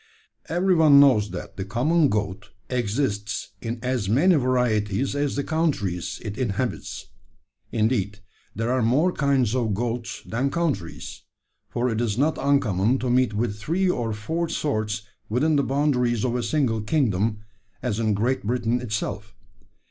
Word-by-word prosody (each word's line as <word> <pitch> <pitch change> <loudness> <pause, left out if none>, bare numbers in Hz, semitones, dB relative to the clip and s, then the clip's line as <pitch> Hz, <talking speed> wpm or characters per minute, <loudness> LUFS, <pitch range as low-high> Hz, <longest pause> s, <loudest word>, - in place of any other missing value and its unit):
"Every 180 +3 +2
one 155 -4 +7
knows 125 -7 +5
that 90 -1 -8
the 95 - -2
common 140 - +2
goat 100 -1 -2 0.2
exists 110 -3 -1
in 115 +1 -3
as 125 -6 -1
many 155 - +4
varieties 125 - +1
as 145 -1 0
the 140 - -1
countries 135 - -1
it 105 +3 -5
inhabits. 120 -1 -3 0.6
Indeed, 110 -3 0 0.4
there 115 +4 -1
are 130 0 +2
more 135 +11 +3
kinds 135 -8 +1
of 115 -5 0
goats 115 0 -3
than 125 +5 -1
countries: 140 - -3 0.5
for 120 +1 -1
it 115 -1 -1
is 110 -3 -1
not 150 +4 +1
uncommon 125 -5 +2
to 125 -1 -1
meet 125 -3 +2
with 110 -1 -1
three 170 - 0
or 120 -8 -2
four 160 +11 -2
sorts 110 -8 -1 0.3
within 145 +8 +2
the 140 - +4
boundaries 130 -5 +1
of 125 -1 0
a 125 - 0
single 115 -2 0
kingdom 105 -4 0 0.4
as 115 -4 -1
in 110 -2 +1
Great 120 +6 0
Britain 120 +2 0
itself. 105 -2 -4
120 Hz, 150 wpm, -24 LUFS, 105-140 Hz, 0.6 s, one